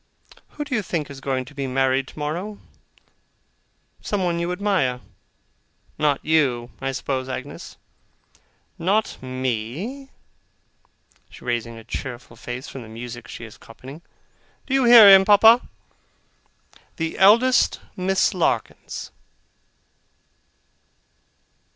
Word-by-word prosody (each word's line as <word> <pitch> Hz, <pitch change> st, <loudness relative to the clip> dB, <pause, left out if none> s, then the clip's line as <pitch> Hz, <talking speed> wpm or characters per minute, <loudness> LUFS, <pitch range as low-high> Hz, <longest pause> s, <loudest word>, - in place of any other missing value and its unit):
'Who 295 Hz, -, -4 dB
do 290 Hz, -, -6 dB
you 225 Hz, -, +1 dB
think 160 Hz, -7 st, -4 dB
is 135 Hz, -1 st, -10 dB
going 130 Hz, -2 st, -2 dB
to 140 Hz, -, -14 dB
be 140 Hz, -2 st, -4 dB
married 130 Hz, 0 st, +1 dB
tomorrow? 170 Hz, +8 st, -5 dB, 1.4 s
Someone 180 Hz, -4 st, -1 dB
you 170 Hz, +1 st, -2 dB
admire.' 180 Hz, -10 st, 0 dB, 1.0 s
'Not 150 Hz, -2 st, +1 dB
you, 130 Hz, -7 st, +1 dB
I 135 Hz, -, -1 dB
suppose, 130 Hz, -1 st, -3 dB
Agnes?' 130 Hz, +2 st, -7 dB, 1.0 s
'Not 200 Hz, +6 st, 0 dB
me!' 130 Hz, -, -4 dB, 1.3 s
raising 120 Hz, -1 st, -3 dB
her 115 Hz, -, -11 dB
cheerful 120 Hz, 0 st, -7 dB
face 125 Hz, +2 st, -7 dB
from 135 Hz, -, -8 dB
the 115 Hz, -, -11 dB
music 120 Hz, +1 st, -9 dB
she 115 Hz, -, -9 dB
is 110 Hz, -, -14 dB
copying. 135 Hz, +7 st, -12 dB, 0.6 s
'Do 265 Hz, -, -4 dB
you 270 Hz, -2 st, +3 dB
hear 235 Hz, -3 st, +10 dB
him, 195 Hz, -1 st, +9 dB
Papa? 220 Hz, +4 st, +6 dB, 1.3 s
The 165 Hz, -1 st, -4 dB
eldest 230 Hz, +7 st, +5 dB, 0.2 s
Miss 190 Hz, +1 st, +1 dB
Larkins. 180 Hz, -3 st, -2 dB
145 Hz, 110 wpm, -22 LUFS, 130-195 Hz, 1.4 s, hear